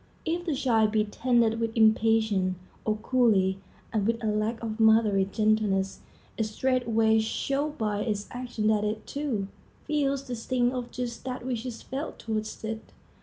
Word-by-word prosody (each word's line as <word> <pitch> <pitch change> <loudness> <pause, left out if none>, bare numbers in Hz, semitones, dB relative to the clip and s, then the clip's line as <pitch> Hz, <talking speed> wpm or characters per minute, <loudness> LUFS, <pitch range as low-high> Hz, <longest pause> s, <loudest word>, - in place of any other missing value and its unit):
If 345 +2 -2
the 310 - +1
child 225 -6 +2
be 215 -1 +3
tended 230 0 +2
with 230 0 -2
impatience, 220 -4 +3 0.3
or 215 - +1
coolly 200 -7 +3 0.3
and 210 -2 +1
with 230 0 0
a - - -1
lack 215 +2 0
of 220 0 -4
motherly 220 -3 +5
gentleness, 210 -2 +1 0.4
it 220 - +1
straightway 225 -1 +2
shows 275 +6 -1
by 210 -2 -1
its 210 -1 -2
action 245 -3 -4
that 210 -1 +2
it, 210 +1 -2
too, 265 -9 -2 0.4
feels 280 -2 0
the 250 -2 -5
sting 245 +2 0
of 250 -2 -4
just 245 -2 -5
that 250 -1 -4
which 250 -1 -2
is 235 -2 -7
felt 275 +4 -5
towards 215 -1 -4
it. 220 0 -3
225 Hz, 165 wpm, -28 LUFS, 215-250 Hz, 0.4 s, motherly